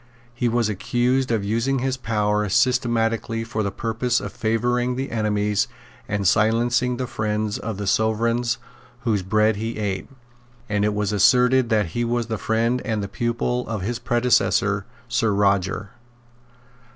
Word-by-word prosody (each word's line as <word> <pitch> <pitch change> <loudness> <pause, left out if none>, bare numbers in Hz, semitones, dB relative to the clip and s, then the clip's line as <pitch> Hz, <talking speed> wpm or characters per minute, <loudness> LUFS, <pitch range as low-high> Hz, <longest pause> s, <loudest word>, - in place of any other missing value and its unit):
He 120 0 0
was 115 -1 +1
accused 120 +5 0
of 115 -3 0
using 115 +6 0
his 130 +1 -1
power 105 -4 0
systematically 115 -1 +1
for 115 -1 -3
the 100 - 0
purpose 115 +4 -1
of - - -7
favouring 120 +3 0
the 135 +2 -4
enemies 105 -2 0 0.4
and 100 -2 0
silencing 120 +4 +2
the 130 - -2
friends 105 -3 -2
of 110 -2 -4
the 100 - -4
Sovereigns 115 +4 +1 0.4
whose 110 -6 0
bread 105 +3 +2
he 115 +2 -4
ate; 100 -3 -3 0.6
and 105 -1 0
it 105 0 +1
was 105 0 -1
asserted 125 +4 +4
that 105 -5 +2
he 120 +9 -2
was 120 0 0
the 110 -2 -4
friend 115 +3 0
and 110 -4 -2
the - - -3
pupil 120 +4 -2
of 110 -5 -3
his 120 +4 -2
predecessor 115 -5 +1 0.2
Sir 120 -3 +1
Roger. 100 0 +1
115 Hz, 150 wpm, -23 LUFS, 105-120 Hz, 0.6 s, asserted